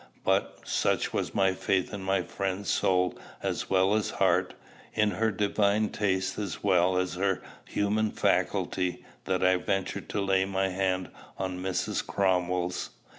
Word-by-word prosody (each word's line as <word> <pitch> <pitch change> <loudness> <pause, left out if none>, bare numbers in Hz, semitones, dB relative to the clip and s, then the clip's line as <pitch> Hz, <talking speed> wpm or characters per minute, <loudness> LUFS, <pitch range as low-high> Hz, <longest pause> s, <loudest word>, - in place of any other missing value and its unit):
But, - - 0
such - - 0
was - - -2
my 95 -1 +3
faith 95 +1 0
in 100 - -4
my 95 +1 +1
friend's 100 +1 -2
soul 90 -1 +1 0.2
as - - -2
well 95 +1 +3
as 110 -1 +1
heart, - - +1 0.4
in 105 -1 +3
her 110 +1 +1
divine 105 +1 +1
taste 95 -2 -1
as 100 -6 -4
well 90 -2 +3
as 90 0 0
her 95 +1 0 0.2
human 105 +1 +1
faculty, 90 -3 0 0.2
that 95 -1 0
I 95 0 +5
ventured 95 +1 -2
to 100 - -1
lay 95 -1 +2
my 95 0 0
hand 95 0 -1 0.3
on 95 -1 -3
Mrs. 95 -1 -1
Cromwell's. 90 -2 0
95 Hz, 150 wpm, -28 LUFS, 95-100 Hz, 0.4 s, I